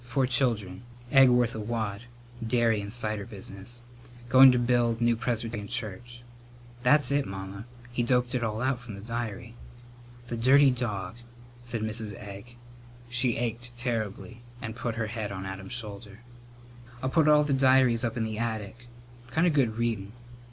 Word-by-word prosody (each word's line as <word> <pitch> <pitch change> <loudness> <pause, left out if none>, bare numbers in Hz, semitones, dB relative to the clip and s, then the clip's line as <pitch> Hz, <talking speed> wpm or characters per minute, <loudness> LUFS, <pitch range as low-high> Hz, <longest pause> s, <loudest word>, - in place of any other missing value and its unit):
Four 130 +2 0
children. 120 -7 0 0.3
Egg 135 -2 +7
worth 120 -1 +3
a 110 - -5
wad. 110 -1 -3 0.4
Dairy 115 -2 +2
and 100 0 -6
cider 110 -3 -2
business. 100 +4 -9 0.5
Going 130 +1 +9
to 125 - +2
build 120 -1 +2
new 120 0 +3
Presbyterian 115 -3 -3
church.' 120 +2 -5 0.6
That's 140 +1 +4
it, 140 0 +1
Mamma. 95 +2 -7 0.3
He 120 - -1
doped 125 +1 +1
it 125 -2 0
all 110 +1 -2
out 130 -2 0
from 115 -4 -9
the 100 - -9
diary." 115 0 -5 0.7
"The 120 -1 -5
dirty 135 +4 +6
dog!" 115 -4 -3 0.4
said 120 -2 -4
Mrs. 110 -1 -3
Egg. 100 +4 -10 0.5
She 120 0 +1
ached 120 +1 -3
terribly 115 -1 -3 0.2
and 115 -1 -6
put 120 -1 -3
her 115 -1 -1
head 110 -2 -4
on 95 -1 -5
Adam's 95 +3 -6
shoulder. 105 -2 -7 0.8
"I'll 130 - +1
put 160 +2 +3
all 150 0 +6
the 145 -1 0
diaries 130 -3 +4
up 115 -1 -2
in 115 - 0
the 110 -1 -3
attic. 115 +1 -4 0.4
Kind 160 +8 +2
of 170 - +3
good 120 -6 +1
readin.' 110 -4 -2
120 Hz, 165 wpm, -28 LUFS, 110-125 Hz, 0.8 s, Going